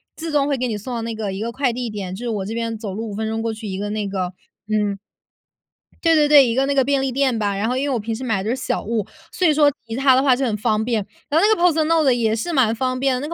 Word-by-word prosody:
自 325 -1 -5
动 285 -1 +2
会 285 - +1
给 255 -1 -2
你 215 - -2
送 240 +4 -6
到 230 - -3
那 230 0 -4
个 215 -3 -4
一 195 - -5
个 230 +1 -2
快 255 -1 0
递 245 -1 -3
点， 195 -3 -5
就 235 - -8
是 - - -2
我 205 -4 -2
这 220 - -5
边 230 -1 -3
走 210 -3 -6
路 220 +2 -5
5 - - -6
分 220 +2 -3
钟 225 0 -2
过 225 0 -2
去 220 0 -8
一 190 -1 -4
个 205 +1 -3
那 210 -1 -2
个 185 -2 -3 0.4
嗯。 210 -2 0 1.1
对 330 -1 +4
对 300 -1 +4
对， 290 -3 +7
一 230 - 0
个 265 +3 +2
那 280 0 0
个 270 - +4
便 275 0 +1
利 270 -1 -1
店 260 -3 +1
吧， 205 -2 0
然 200 +2 -1
后 255 - -1
因 280 +2 -1
为 - - 0
我 245 - +1
平 225 +1 -3
时 250 +4 -5
买 220 -6 0
的 215 - -3
都 - - +1
是 265 - -3
小 - - -2
物， 220 -2 -1 0.3
所 360 - +1
以 310 - +4
说 295 -1 +4 0.2
其 225 - -5
实 265 - -3
它 270 -1 +6
的 260 - +4
话 265 -3 +4
就 270 - -2
很 220 - 0
方 215 +1 0
便。 230 -1 0 0.3
然 310 - +3
后 410 - +4
那 435 - +4
个 345 - -2 0.2
PostNord 315 -4 +3
也 225 -2 +1
是 290 +10 -3
蛮 250 -7 +2
方 255 +1 -1
便 270 -1 +2
的， - - -4
那 330 - -5
235 Hz, 385 characters per minute, -21 LUFS, 215-275 Hz, 1.1 s, 对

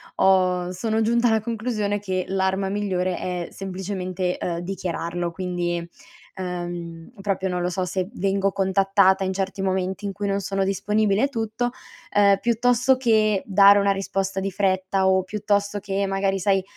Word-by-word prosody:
ho 180 -2 +3
sono 220 +4 -1
giunta 235 +2 +2
alla 220 0 +2
conclusione 215 -2 -2
che 185 -2 -2
l'arma 190 0 0
migliore 185 -3 -1
è 180 -1 -3
semplicemente, 185 -1 -3
ehm, 170 -1 -3
dichiararlo. 175 -1 -3
Quindi, 175 -1 -2 0.5
ehm, 175 -2 -5
proprio 195 -1 -1
non 180 -1 -2
lo 175 - 0
so 185 +1 -2
se 180 0 -2
vengo 195 -1 0
contattata 195 0 +3
in 190 0 -1
certi 195 0 -3
momenti 190 +1 -1
in 200 - -2
cui 205 +1 -3
non 200 0 0
sono 195 0 -1
disponibile 205 +2 +1
e - - +4
tutto, 230 -1 -2 0.4
ehm, 200 -1 +5
piuttosto 245 +3 +3
che 215 -5 +2
dare 200 0 +6
una 200 0 +2
risposta 195 0 -2
di 195 +1 -2
fretta 190 0 +1
o 190 0 +3
piuttosto 205 +1 -1
che 200 0 -2
magari 195 0 0
sai, 195 0 +2
195 Hz, 155 wpm, -23 LUFS, 185-205 Hz, 0.5 s, dare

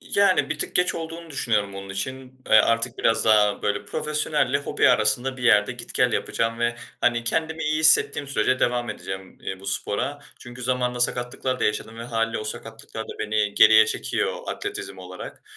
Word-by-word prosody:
İii, - - -5
yani, 200 -5 +4
bir 155 - -2
tık - - -3
geç 180 0 +2
olduğunu 165 0 -7
düşünüyorum 105 -7 -1
onun 95 0 -8
için. 130 +6 -6
Eee, - - +6
artık 115 +2 +2
biraz 115 0 +2
daha, 105 -2 +4
böyle, 105 - -1
profesyonelle 150 -2 0
hobi 140 - +2
arasında 120 +5 +2
bir 125 - -9
yerde 105 -3 +4
git - - -11
gel - - +2
yapacağım 115 0 -1
ve, 120 0 0 0.2
hani, 120 -1 +1
kendimi 160 +5 -1
iyi 155 +1 +1
hissettiğim 155 -2 +4
sürece 130 -1 +1
devam 120 0 +1
edeceğim, 95 0 -8
eee, 95 0 -6
bu 100 - -12
spora. 140 +9 -2 0.2
Çünkü 120 0 -10
zamanında 125 0 -1
sakatlıklar 125 +1 -1
da - - +1
yaşadım 110 +2 -2
ve - - -5
hâliyle 115 -1 -1
o 110 - -5
sakatlıklar 110 +1 -7
da - - -8
beni 105 -1 0
geriye 110 0 +7
çekiyor - - -2
atletizm 95 -1 -5
olarak. 90 0 -9
120 Hz, 185 wpm, -24 LUFS, 105-130 Hz, 0.2 s, geriye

